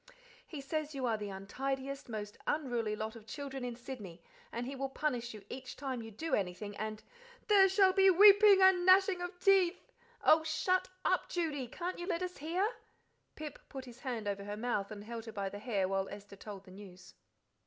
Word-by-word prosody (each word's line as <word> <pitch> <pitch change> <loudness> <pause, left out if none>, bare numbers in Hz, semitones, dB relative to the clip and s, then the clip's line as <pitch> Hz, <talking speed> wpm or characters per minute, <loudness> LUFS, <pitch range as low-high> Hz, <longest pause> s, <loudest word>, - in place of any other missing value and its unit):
He 300 -4 -7
says 305 +1 -3
you 265 -2 -2
are 230 -2 +2
the 210 -1 -5
untidiest, 265 +8 -4
most 210 -2 -5
unruly 240 -8 0
lot 220 +1 -4
of 220 -1 -13
children 275 -2 -6
in 245 -1 -4
Sydney, 210 -9 -9 0.3
and 235 +1 -3
he 270 +2 -5
will 270 0 -3
punish 250 -4 -2
you 205 -2 -12
each 255 +2 -7
time 260 -3 -4
you 225 - -8
do 320 +10 -5
anything, 200 +2 -2
and 215 0 -4 0.2
" 485 0 -23
"There 390 -2 +7
shall 385 -1 +5
be 385 0 +6
weeping 400 +1 +8
and 375 -1 +6
gnashing 375 0 +5
of 355 0 -6
teeth." 380 -2 +3 0.3
"Oh, 315 - +6
shut 365 +4 +1 0.2
up, - - +1
Judy! 305 -7 -2
Can't 350 +9 -5
you 350 - -5
let 355 -2 -1
us 365 0 -5
hear?" 345 +7 0 0.7
Pip 305 -2 -7
put 265 -1 -7
his 245 -1 -12
hand 240 -6 -4
over 200 0 -2
her 205 +1 -5
mouth 215 -4 -1
and 205 -2 -8
held 230 +1 -7
her 225 - -7
by 200 -2 -3
the 205 - -8
hair 205 -5 0
while 195 0 -1
Esther 200 0 -10
told 200 -1 -9
the 190 - -15
news. 185 -2 -13
260 Hz, 205 wpm, -33 LUFS, 210-345 Hz, 0.7 s, weeping